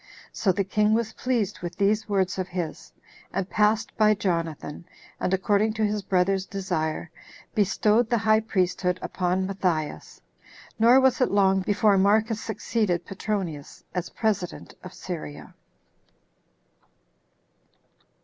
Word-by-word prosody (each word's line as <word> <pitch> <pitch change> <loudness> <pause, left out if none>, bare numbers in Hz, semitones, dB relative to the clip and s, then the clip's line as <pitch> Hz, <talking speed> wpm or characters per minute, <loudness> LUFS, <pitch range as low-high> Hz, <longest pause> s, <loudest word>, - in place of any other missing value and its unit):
So 195 - +1
the 195 +2 0
king 210 +2 +2
was 225 -1 -1
pleased 230 -6 -1
with 175 0 -5
these 210 +2 +1
words 190 -2 0
of 185 - -2
his, 165 - -5 0.4
and 195 -2 -2
passed 210 +2 +1
by 215 -1 +5
Jonathan, 165 -6 -3 0.4
and, - - -1
according 205 +3 +2
to 220 -1 0
his 210 0 -1
brother's 190 0 +1
desire, 170 -4 -3 0.4
bestowed 215 +3 +2
the 240 - +2
high 215 0 +3
priesthood 180 -4 0
upon 185 +1 -1
Matthias. 175 - -2 0.6
Nor 240 +4 +7
was 265 -1 +3
it 255 - +3
long 195 -1 +3
before 205 0 +3
Marcus 215 +3 +2
succeeded 215 -5 -1
Petronius, 190 -7 -4
as 180 -1 -3
president 200 - -2
of - - -8
Syria. 75 0 -7
195 Hz, 125 wpm, -25 LUFS, 180-215 Hz, 0.6 s, Nor